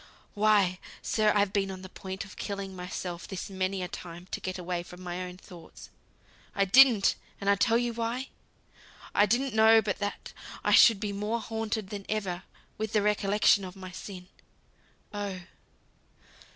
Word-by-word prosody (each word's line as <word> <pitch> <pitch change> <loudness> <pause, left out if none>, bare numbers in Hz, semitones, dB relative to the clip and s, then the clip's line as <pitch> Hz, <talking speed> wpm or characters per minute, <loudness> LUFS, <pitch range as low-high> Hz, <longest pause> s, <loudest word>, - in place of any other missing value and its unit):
"Why, 205 -3 +3 0.2
sir, 215 -1 +2
I've 200 -1 +2
been 195 -1 +1
on 190 -1 -7
the - - -7
point 190 0 -7
of 195 - -13
killing 200 -2 -5
myself 180 -1 -5
this 190 0 -6
many 190 0 -1
a - - -3
time 175 0 -9
to - - -3
get 185 0 -4
away 180 -1 -3
from 180 +1 -12
my 180 0 -4
own 180 0 -6
thoughts. 175 -3 -13 0.6
I 200 - +3
didn't! 235 0 +6 0.3
and 200 - -5
I'll 200 - +5
tell 230 +3 +3
you 240 0 -1
why. 235 +3 -3 0.8
I 205 - +4
didn't 255 +4 +1
know 220 +1 +7
but 205 -3 -2
that 205 0 -4 0.3
I - - +1
should 225 -5 +7
be 205 -1 -3
more 210 +3 -2
haunted 220 -3 -3
than 200 -1 -6
ever 195 -5 -2 0.4
with 220 0 -3
the 210 -2 +3
recollection 205 -1 +3
of 185 0 -7
my 185 -1 -9
sin. 185 0 -9 0.9
Oh! 200 -3 -4
200 Hz, 170 wpm, -29 LUFS, 185-215 Hz, 0.9 s, know